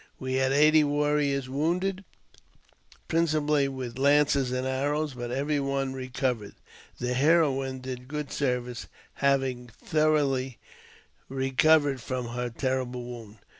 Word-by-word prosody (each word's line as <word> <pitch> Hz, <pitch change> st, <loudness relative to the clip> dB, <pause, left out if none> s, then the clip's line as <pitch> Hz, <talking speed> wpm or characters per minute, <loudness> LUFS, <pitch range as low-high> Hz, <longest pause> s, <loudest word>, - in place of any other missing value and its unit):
We 130 Hz, 0 st, -3 dB
had 130 Hz, 0 st, +2 dB
eighty 155 Hz, +2 st, +5 dB
warriors 145 Hz, -2 st, +1 dB
woundedJ 180 Hz, +8 st, -1 dB, 1.0 s
principally 150 Hz, -3 st, +2 dB
with 130 Hz, -2 st, -6 dB
lances 140 Hz, -2 st, +3 dB
and 130 Hz, 0 st, -2 dB
arrows, 145 Hz, +3 st, -1 dB
but 120 Hz, -1 st, -6 dB
every 140 Hz, +4 st, 0 dB
one 135 Hz, -1 st, -1 dB
recovered.! 130 Hz, -4 st, -3 dB, 0.4 s
The 125 Hz, 0 st, -2 dB
heroine 135 Hz, -2 st, +2 dB
did 125 Hz, -1 st, -7 dB
good 150 Hz, 0 st, -5 dB
service, 125 Hz, -3 st, -2 dB, 0.3 s
having 135 Hz, -3 st, +1 dB
thoroughly 135 Hz, -1 st, 0 dB, 0.7 s
recovered 135 Hz, +1 st, +2 dB
from 125 Hz, -2 st, -4 dB
her 125 Hz, +1 st, -3 dB
terrible 125 Hz, 0 st, -2 dB
wound. 115 Hz, -4 st, -9 dB
135 Hz, 115 wpm, -27 LUFS, 130-150 Hz, 1.0 s, eighty